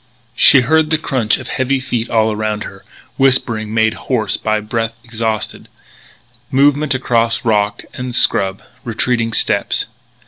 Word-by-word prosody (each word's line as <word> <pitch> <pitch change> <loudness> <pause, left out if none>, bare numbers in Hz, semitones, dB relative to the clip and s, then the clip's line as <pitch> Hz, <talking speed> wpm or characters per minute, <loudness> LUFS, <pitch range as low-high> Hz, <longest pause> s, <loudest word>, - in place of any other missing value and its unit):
She 135 - +7
heard 155 +4 +2
the 160 - +2
crunching 130 -8 0
of - - -10
heavy 130 +1 -1
feet 120 -3 -3
all 110 -1 +2
around 105 0 -3
her, - - -11 0.3
whispering 120 -5 +2
made 110 0 +2
hoarse 115 -5 -2
by 110 0 -1
breath 115 +2 -3
exhausted, 110 -2 -4 0.8
movement 145 +1 +2
across 115 -3 0
rock 105 -2 0
and 125 -1 -5
scrub, 95 0 +2 0.2
retreating 115 0 -1
steps. - - +1
115 Hz, 135 wpm, -16 LUFS, 110-130 Hz, 0.8 s, She